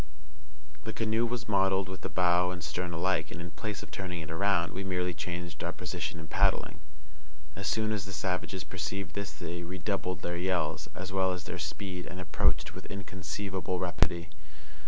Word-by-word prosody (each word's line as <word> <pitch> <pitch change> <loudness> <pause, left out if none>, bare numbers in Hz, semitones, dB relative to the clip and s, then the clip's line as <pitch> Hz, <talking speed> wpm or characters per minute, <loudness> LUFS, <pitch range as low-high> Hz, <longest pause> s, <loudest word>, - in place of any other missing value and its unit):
The 110 - -3
canoe 115 +1 +2
was 120 0 -2
modelled 95 -2 +4
with 95 0 -6
the - - -2
bow 90 0 +5
and 90 -1 -3
stern 85 +3 -1
alike, 85 -2 +2
and, - - -6
in 85 0 -5
place 105 +6 -3
of - - -10
turning 90 -3 -3
it 80 - -6
around, 85 0 +3
we 95 - -2
merely 90 -1 +1
changed 85 0 -4
our - - +1
position 80 - -3
in 80 - -7
paddling. 75 - +3 0.8
As 100 0 -3
soon 110 -1 +2
as 105 -2 0
the 95 - -6
savages 95 0 -1
perceived 95 0 -3
this 100 -1 -2
they 85 0 -4
redoubled 90 +1 -1
their 85 0 0
yells, 90 -3 +1
as 95 +1 -4
well 95 -1 +4
as 90 -1 -4
their 90 - -4
speed, 90 +4 -3
and 90 - -5
approached 90 - +3
with - - -8
inconceivable 95 -1 -2
rapidity. 85 -2 +2
90 Hz, 180 wpm, -32 LUFS, 85-95 Hz, 0.8 s, bow